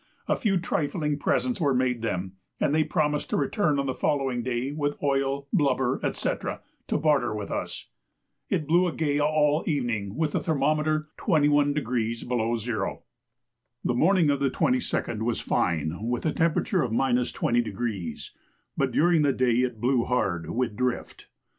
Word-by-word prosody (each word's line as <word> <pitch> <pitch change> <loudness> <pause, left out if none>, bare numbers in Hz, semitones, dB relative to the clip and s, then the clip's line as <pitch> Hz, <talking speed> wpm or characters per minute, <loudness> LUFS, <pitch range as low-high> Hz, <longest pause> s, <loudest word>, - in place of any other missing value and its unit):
A - - +2
few 200 -4 +1
trifling 150 -3 -1
presents 245 +3 0
were 140 -4 +2
made 125 -2 +1
them, 95 -4 -2 0.3
and 145 - +1
they 155 0 +4
promised 150 -1 0
to - - 0
return 150 +1 +1
on 140 - 0
the 130 - -1
following 135 -5 0
day 125 +2 -2
with 145 -1 -2
oil, 140 0 0
blubber, 130 -3 +2
&c. - - -2 0.6
to - - +1
barter 145 -8 +2
with 105 -1 -5
us. - - -4 0.6
It 155 - 0
blew 175 +4 +3
a 170 - -2
gale 145 -2 +1
all 150 0 +2
the - - -2
evening, 115 -8 -2
with 155 0 0
the - - 0
thermometer 155 0 0
21° 145 - +1
below 120 -1 0
zero. 110 -3 -3 0.8
The - - +1
morning 165 +3 +4
of 140 - 0
the 140 -1 +2
22d 250 - 0
was 115 0 0
fine 80 -2 0
with 120 +5 -2
a 155 - +1
temperature 170 +3 +1
of 125 - 0
20°, 120 - -1 0.5
but 135 -1 0
during 165 +5 +3
the 145 -2 +3
day 125 -2 +2
it 125 -3 0
blew 125 +1 +2
hard 95 -9 -1
with 120 -3 -1
drift. 125 0 -3
135 Hz, 160 wpm, -26 LUFS, 120-150 Hz, 0.8 s, they